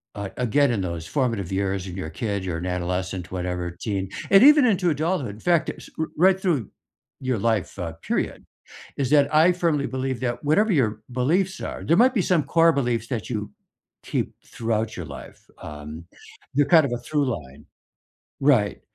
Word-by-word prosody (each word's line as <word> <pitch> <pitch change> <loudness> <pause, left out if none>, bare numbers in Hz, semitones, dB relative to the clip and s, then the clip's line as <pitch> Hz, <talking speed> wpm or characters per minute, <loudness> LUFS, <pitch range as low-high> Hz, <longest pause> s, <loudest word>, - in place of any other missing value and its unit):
a 100 -1 -5
again, 125 +3 +2
in 105 -5 -1
those 85 -3 -4
formative 115 - -1
years 95 -1 -1
and 90 - -7
you're 95 - -4
a - - -9
kid 100 -3 -1
you're 85 -3 -2
an 90 - -5
adolescent, 90 0 -3
whatever, 90 -1 -3
teen, 95 -3 -2 0.2
and 195 +4 +8
even 295 -2 +8
into 190 -6 +2
adulthood, 155 - -1
in - - -14
fact, 170 -3 +2
uh, - - -3
s - - -12
r 160 - +1 0.2
right 190 0 +4
through 175 -7 +2 0.6
your 130 -4 -1
life, 105 -4 -1
uh, 85 -2 -3 0.2
period - - -2 0.5
is 135 -3 0
that 145 0 +4
I 160 +4 +6
firmly 165 -5 0
believe 130 0 -3
that 120 -2 -2
whatever 205 +9 +3
your 110 -7 +1
beliefs 175 +10 0
are, - - -5
there 165 - +3
might 255 0 +3
be 205 - +3
some 165 -5 +4
core 165 +3 +4
beliefs 120 -4 -1
that 120 -4 -4
you 105 -2 -4 0.5
keep - - -2
throughout 115 -1 -2
your - - -5
life, - - -10 0.2
um, 75 +2 -8 0.5
they're 145 - +4
kind 160 -3 +7
of 120 - -3
a - - -1
through 150 -2 0
line 70 0 -14 0.8
right. 125 -8 +3
120 Hz, 190 wpm, -24 LUFS, 95-155 Hz, 0.8 s, and